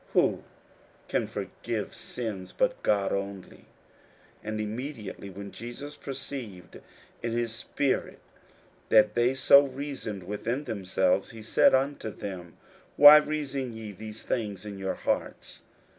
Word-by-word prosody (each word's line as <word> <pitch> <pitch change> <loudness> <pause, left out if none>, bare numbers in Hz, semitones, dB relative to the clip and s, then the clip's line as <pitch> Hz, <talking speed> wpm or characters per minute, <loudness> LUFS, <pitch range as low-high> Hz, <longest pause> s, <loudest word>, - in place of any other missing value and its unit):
who - - +3 0.7
can - - 0
forgive - - -4
sins 100 -6 -5
but - - +1
God 100 -2 +1
only? 100 -1 -5 0.8
41:002:008 - - -21
And 110 0 -3
immediately 110 -2 -5
when 100 +1 -8
Jesus 125 +6 -8
perceived 130 -9 -7 0.4
in 115 -1 -2
his 120 -1 -1
spirit 130 +4 -1 0.7
that 105 -1 +6
they 120 +3 +2
so 140 +1 +7
reasoned 130 -7 -5
within 115 +8 -3
themselves, 95 -4 0
he 115 -1 -10
said 115 - +5
unto 135 -3 -1
them, 95 -5 -8 0.4
Why 145 +1 +12
reason 140 -4 -2
ye 110 -2 -7
these 110 +2 -9
things 105 -4 -3
in 100 -2 -7
your 95 -1 -2
hearts? - - -3
110 Hz, 130 wpm, -28 LUFS, 100-135 Hz, 0.8 s, Why